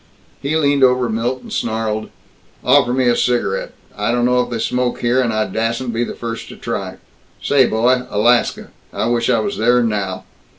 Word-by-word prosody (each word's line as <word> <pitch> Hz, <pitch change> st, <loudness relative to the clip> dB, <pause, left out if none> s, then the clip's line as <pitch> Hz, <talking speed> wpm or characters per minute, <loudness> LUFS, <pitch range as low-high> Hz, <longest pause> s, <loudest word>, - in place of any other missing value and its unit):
He 145 Hz, +3 st, -1 dB
leaned 140 Hz, -3 st, +2 dB
over 125 Hz, -1 st, +3 dB
Milt 120 Hz, +3 st, -2 dB
and -, -, -9 dB
snarled, 110 Hz, -1 st, -2 dB, 0.5 s
"Offer 130 Hz, 0 st, +4 dB
me 130 Hz, 0 st, +1 dB
a 120 Hz, -, +4 dB
cigarette. 120 Hz, -7 st, 0 dB, 0.2 s
I 105 Hz, +2 st, -1 dB
don't 120 Hz, 0 st, +1 dB
know 125 Hz, 0 st, +3 dB
if 125 Hz, -, -4 dB
they 120 Hz, -, -3 dB
smoke 125 Hz, +1 st, -1 dB
here, 125 Hz, +2 st, +2 dB
and 120 Hz, -3 st, 0 dB
I 110 Hz, 0 st, 0 dB
dassn't 115 Hz, +4 st, -2 dB
be 115 Hz, +1 st, 0 dB
the -, -, -5 dB
first 115 Hz, -1 st, -6 dB
to -, -, -9 dB
try. -, -, -5 dB, 0.4 s
Say, 135 Hz, -3 st, +3 dB
boy, 125 Hz, +3 st, +2 dB
Alaska 120 Hz, +4 st, +1 dB, 0.2 s
I -, -, -2 dB
wish 120 Hz, 0 st, 0 dB
I 125 Hz, -, +4 dB
was 110 Hz, -, -3 dB
there 120 Hz, +2 st, +3 dB
now! 100 Hz, -4 st, -2 dB
120 Hz, 195 wpm, -18 LUFS, 115-125 Hz, 0.5 s, Offer